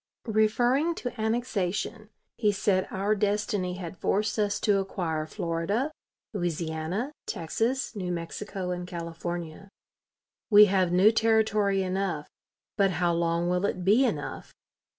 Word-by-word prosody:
Referring 240 +8 +2
to 245 -5 -5
annexation, 220 -2 -1 0.3
he 210 -3 +2
said 195 -1 +1
our 200 +3 0
destiny 205 -3 0
had 175 -1 -7
forced 210 +2 0
us 205 -1 +1
to 205 -3 +3
acquire 165 -5 -2
Florida, 170 - -1 0.4
Louisiana, 175 - -2 0.2
Texas, 225 - -1
New 185 -3 -3
Mexico, 180 +2 -4
and 180 0 -4
California. 170 +1 -6 0.8
"We 210 -1 +9
have 185 -3 +2
now 190 +5 +6
territory 215 -3 +2
enough, 185 -5 -2 0.5
but 200 -2 +4
how 175 -1 +2
long 170 0 +1
will 180 +1 +1
it 180 -2 -3
be 215 +7 +5
enough? 160 - -3
195 Hz, 125 wpm, -28 LUFS, 175-215 Hz, 0.8 s, We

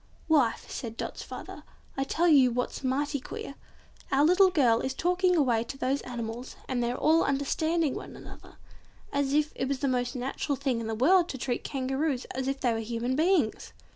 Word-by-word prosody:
"Wife" 290 -8 +2
said 230 -2 -6
Dot's - - -5
father, - - -8 0.3
"I'll 270 - -1
tell 335 +5 +1
you 275 -6 +6
what's 245 +3 -3
mighty 285 +3 0
queer, 270 - -7 0.6
our 275 +2 +4
little 370 +3 +6
girl 250 -9 +3
is 265 0 -3
talking 360 +2 +2
away 245 -8 +2
to 270 - -7
those 270 +2 0
animals, 240 0 -6
and 255 -2 -1
they're 240 +1 -1
all 320 +2 +4
understanding 310 +3 0
one - - -7
another, - - -13 0.6
as 280 -1 0
if 300 0 +1
it 260 - -2
was 275 0 -1
the 275 - -1
most 250 0 -1
natural 265 +3 -2
thing 265 -3 -1
in 225 - -4
the 225 - -2
world 345 +9 +4
to 265 - -4
treat 245 -1 -2
Kangaroos 270 0 -2
as 265 0 -3
if 275 0 -2
they 245 -3 +2
were 225 - -2
human 235 +3 -2
beings!" 315 - +1
270 Hz, 195 wpm, -28 LUFS, 245-300 Hz, 0.6 s, you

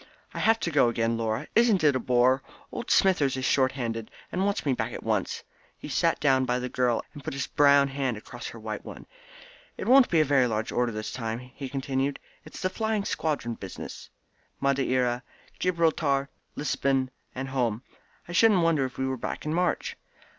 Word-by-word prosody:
"I - - -5
have 225 +1 +3
to 170 - -1
go 140 -5 +4
again, 115 0 0
Laura. 115 +4 -2
Isn't 225 -6 +4
it 145 -3 +5
a - - +1
bore? 125 +2 +3 0.3
Old - - -6
Smithers 145 -9 +3
is 130 - -2
short 130 -1 +3
handed, 115 -4 -4 0.2
and 185 - 0
wants 200 -4 -1
me 140 - +2
back - - -3
at - - -7
once." - - -1 0.3
He - - -9
sat - - +1
down 135 -3 +3
by 125 -1 0
the 125 0 -3
girl, 125 -2 +1
and 145 -3 -10
put 135 - -4
his 135 - -2
brown 140 -1 +5
hand 135 -4 -2
across 105 - -8
her - - -8
white - - -5
one. - - -10 0.7
"It - - -5
won't 260 +1 +7
be 165 - +3
a 155 - +4
very 135 -3 +3
large 110 -1 -2
order 120 -1 +1
this 110 0 -5
time," 115 -2 -3
he 125 +2 -8
continued. 135 +1 -2 0.3
"It's - - -10
the 185 - +2
flying 220 -2 -1
squadron 145 -7 -1
business 95 -4 -8 0.5
Madeira, 130 -3 +1 0.4
Gibraltar, 160 -6 +1 0.3
Lisbon, 135 -2 0 0.2
and 135 +1 -4
home. 120 -3 -1 0.4
I - - -8
shouldn't 190 0 +5
wonder 160 -5 +3
if 130 - -7
we 130 - -1
were 130 0 -2
back - - -5
in 155 - -1
March." 180 +1 0
135 Hz, 195 wpm, -27 LUFS, 125-155 Hz, 0.7 s, won't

